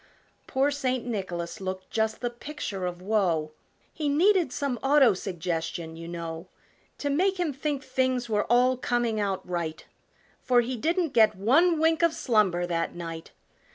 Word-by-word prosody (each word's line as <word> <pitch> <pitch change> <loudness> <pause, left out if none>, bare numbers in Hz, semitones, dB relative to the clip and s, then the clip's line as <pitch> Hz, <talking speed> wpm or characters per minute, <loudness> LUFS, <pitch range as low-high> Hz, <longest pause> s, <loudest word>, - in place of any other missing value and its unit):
'" - - -38
Poor 270 +2 +1
St. 255 -3 -1
Nicholas 190 -5 -4
looked 185 0 -5
just 220 0 -1
the 240 -1 -1
picture 240 -8 -5
of 175 0 -6
woe, 180 -7 +1 0.4
He 300 -2 -2
needed 350 +1 +3
some 255 -2 -2
auto 270 -4 +5
suggestion, 170 -3 -4
you 165 0 -8
know, 170 0 -6 0.5
To 285 - -2
make 375 +6 +1
him 335 -5 0
think 285 0 -3
things 255 -3 0
were 210 -2 0
all 250 +2 +3
coming 240 -3 0
out 195 -2 -2
right, 170 -3 -3 0.6
For 245 -2 +4
he 250 +2 -3
didn't 335 - 0
get 220 -2 +5
one 305 - +3
wink 325 +1 +3
of 335 -1 +3
slumber 200 - +2
that 165 -1 -2
night! 165 -1 -7
230 Hz, 160 wpm, -27 LUFS, 180-280 Hz, 0.6 s, auto